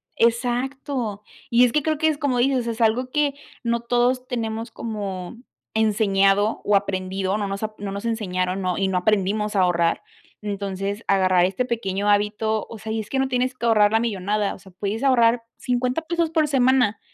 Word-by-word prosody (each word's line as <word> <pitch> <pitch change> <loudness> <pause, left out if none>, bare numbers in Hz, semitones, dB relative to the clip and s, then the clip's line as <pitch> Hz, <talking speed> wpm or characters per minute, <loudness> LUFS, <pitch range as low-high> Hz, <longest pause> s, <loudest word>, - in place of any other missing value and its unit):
Exacto, 240 -1 -1 0.3
y 240 +1 +5
es 240 - +1
que 300 - +2
creo 310 -1 0
que 315 +2 +2
es 305 -2 +1
como 280 -5 0
dices, 255 -2 +1
es 230 0 -3
algo 240 +3 +2
que 290 0 +1 0.3
no 235 0 0
todos 245 +2 +1
tenemos 225 -1 -3
como 205 -3 -5 0.4
enseñado 205 -1 +2
o 205 - +3
aprendido, 190 0 -1
no 205 - -2
nos 195 +2 -4
ap 215 0 -4
no 200 -1 -4
nos 200 +3 -5
enseñaron, 185 -4 -1
¿no? 185 -1 -1
Y 195 -1 +1
no 190 - 0
aprendimos 210 +2 0
a - - +4
ahorrar, 170 -2 +1 0.4
entonces, 200 0 -4
agarrar 185 -2 +4
este 195 +7 -1
pequeño 205 -4 -1
hábito, 210 +1 +1
o 230 - -8
sea, 220 +1 -6
y 225 - -1
es 210 - -11
que 265 - -1
no 265 - +2
tienes 255 0 0
que 235 - -5
ahorrar 210 -2 +4
la 225 - +3
millonada, 205 -2 -1
o - - -15
sea, 190 - -16
puedes 205 +6 -4
ahorrar 235 -3 +4
50 250 +4 -1
pesos 335 0 -1
por 315 -2 +2
semana, 255 -6 +3
220 Hz, 195 wpm, -23 LUFS, 200-245 Hz, 0.4 s, y